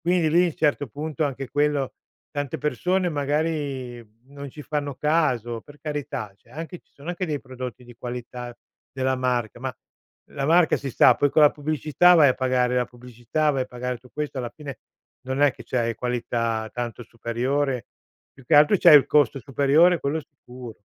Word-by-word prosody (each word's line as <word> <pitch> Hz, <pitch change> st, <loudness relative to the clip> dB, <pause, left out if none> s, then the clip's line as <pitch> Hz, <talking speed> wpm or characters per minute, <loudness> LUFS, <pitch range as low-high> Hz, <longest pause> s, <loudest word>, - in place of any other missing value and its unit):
Quindi 175 Hz, -2 st, +2 dB
lì, 170 Hz, 0 st, +3 dB
certo 145 Hz, -2 st, +1 dB
punto 150 Hz, +4 st, -3 dB
anche 135 Hz, -2 st, -4 dB
quello 145 Hz, -2 st, 0 dB, 0.4 s
tante 145 Hz, +1 st, -3 dB
persone 180 Hz, +6 st, 0 dB
magari 145 Hz, -4 st, -2 dB, 0.2 s
non 140 Hz, 0 st, -9 dB
ci 150 Hz, -, -10 dB
fanno 145 Hz, -2 st, -3 dB
caso, 130 Hz, -8 st, 0 dB
per 145 Hz, 0 st, -16 dB
carità. 145 Hz, -9 st, -4 dB
Cioè 115 Hz, -, -27 dB
anche 165 Hz, +5 st, -7 dB
ci -, -, -41 dB
sono 145 Hz, +4 st, -12 dB
anche 180 Hz, +1 st, -3 dB
dei 150 Hz, -3 st, -2 dB
prodotti 130 Hz, -1 st, -8 dB
di 120 Hz, 0 st, -14 dB
qualità 120 Hz, 0 st, -7 dB, 0.4 s
della 130 Hz, 0 st, 0 dB
marca, 120 Hz, -2 st, -1 dB
ma 130 Hz, -1 st, -4 dB, 0.6 s
la 135 Hz, -, -4 dB
marca, 165 Hz, +1 st, +4 dB
si 140 Hz, -, -5 dB
sa, -, -, +6 dB
poi 145 Hz, -, +2 dB
con 155 Hz, -, +4 dB
la 150 Hz, -, +8 dB
pubblicità 155 Hz, +4 st, +3 dB
vai 150 Hz, -5 st, +7 dB
a 130 Hz, -, +2 dB
pagare 125 Hz, -1 st, +1 dB
la 125 Hz, -, +1 dB
pubblicità, 125 Hz, +5 st, -2 dB
vai 135 Hz, -2 st, 0 dB
a 130 Hz, -, -6 dB
pagare 125 Hz, 0 st, -4 dB
tu 125 Hz, 0 st, -19 dB
questo, 150 Hz, -2 st, -4 dB
alla 120 Hz, -2 st, -4 dB
fine 145 Hz, -5 st, -9 dB, 0.5 s
non 130 Hz, +1 st, -2 dB
è 145 Hz, -, +5 dB
che -, -, -12 dB
c'hai 115 Hz, -2 st, -1 dB
qualità 115 Hz, -2 st, -2 dB
tanto 120 Hz, -1 st, -4 dB
superiore; 125 Hz, +2 st, -2 dB, 0.5 s
più 135 Hz, -, -18 dB
che 150 Hz, -, +2 dB
altro 150 Hz, +7 st, +6 dB
c'hai 150 Hz, -, +9 dB
il 140 Hz, -, +5 dB
costo 145 Hz, -3 st, +3 dB
superiore, 145 Hz, +6 st, +3 dB
quello 150 Hz, +3 st, -1 dB
sicuro, 125 Hz, -4 st, -12 dB
135 Hz, 180 wpm, -24 LUFS, 125-150 Hz, 0.6 s, c'hai